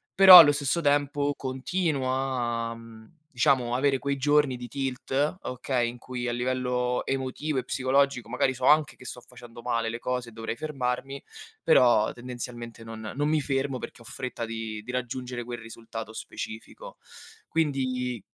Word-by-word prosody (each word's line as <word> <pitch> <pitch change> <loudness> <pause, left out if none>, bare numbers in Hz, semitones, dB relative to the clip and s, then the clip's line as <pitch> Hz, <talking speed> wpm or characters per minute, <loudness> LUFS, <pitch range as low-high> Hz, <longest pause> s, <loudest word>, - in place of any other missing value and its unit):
però 190 -2 +12
allo 150 -3 +9
stesso 145 +4 0
tempo 145 0 +1
continuo 135 +2 -2
a, 120 -3 -1
mhmm, 115 -1 -13 0.3
diciamo 125 -1 +2
avere 135 +1 +2
quei 140 +1 -1
giorni 145 -1 +3
di 125 0 -7
tilt, 135 +4 -2
okay, 125 -1 -1
in 120 - -9
cui 125 -1 -5
a - - -1
livello 125 0 -1
emotivo 135 +2 -2
e 125 - -6
psicologico 135 -1 +1
magari 130 - +1
so 125 +1 -3
anche 150 -1 +4
che - - -15
sto 125 - -7
facendo 120 -1 -13
male 115 -1 -1
le 115 +1 -5
cose 125 -1 -3
e - - -15
dovrei 115 0 -5
fermarmi, 135 -1 -3 0.4
però 120 -4 +4
tendenzialmente 120 -2 -8
non 110 -1 -7
non 145 +2 0
mi 155 0 +2
fermo 135 -1 -1
perché 120 - -9
ho - - -15
fretta 125 -2 -5
di 115 -1 -5
di 125 - -7
raggiungere 125 0 -4
quel 120 0 -6
risultato 115 -1 -8
specifico. 110 0 -8 0.5
Quindi 130 - -1
125 Hz, 160 wpm, -27 LUFS, 120-140 Hz, 0.5 s, però